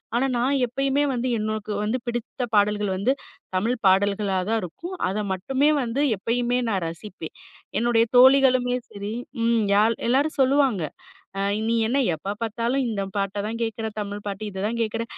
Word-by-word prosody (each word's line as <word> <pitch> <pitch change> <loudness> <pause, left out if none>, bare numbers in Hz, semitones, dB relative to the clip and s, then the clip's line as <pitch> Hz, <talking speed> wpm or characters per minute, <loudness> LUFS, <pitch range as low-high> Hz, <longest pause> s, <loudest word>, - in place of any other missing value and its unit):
ஆனா, 255 +3 +2
நான் 265 +4 +1
எப்பயுமே 275 +3 0
வந்து 250 +1 -1
எனக்கு 215 0 -3
வந்து 220 +5 0
பிடித்த 240 +2 -4
பாடல்கள் 205 0 +2
வந்து 225 +7 +2 0.4
தமிழ் 230 +6 +1
பாடல்களா 200 +1 +3
தான் 225 0 +2
இருக்கும். 340 - -7
அத 195 +3 -2
மட்டுமே 265 +10 +1
வந்து 250 +3 -1
எப்பயுமே 240 +4 0
நான் 190 -4 0
ரசிப்பேன். 165 -1 -8 0.4
என்னுடைய 230 0 +3
தோழிகளுமே 255 -1 +6
சரி 200 +1 -6 0.3
ம் 230 -1 +3
யால் 220 +3 +4
எல்லாரும் 280 +5 +2
சொல்லுவாங்க. 265 - +3 0.6
அ - - 0 0.3
"நீ 230 - +2
என்ன 270 +3 +1 0.2
எப்ப 195 +6 -4
பாத்தாலும் 235 +4 0
இந்த 205 -3 -2
பாட்ட 195 0 -1
தான் 230 +2 -4
கேட்கிற, 225 0 -2
தமிழ் 205 0 -5
பாட்டு 200 +1 -4
இத 190 0 -5
தான் 230 +1 -2
கேட்குற. 225 +1 -2
225 Hz, 160 wpm, -24 LUFS, 205-250 Hz, 0.6 s, தோழிகளுமே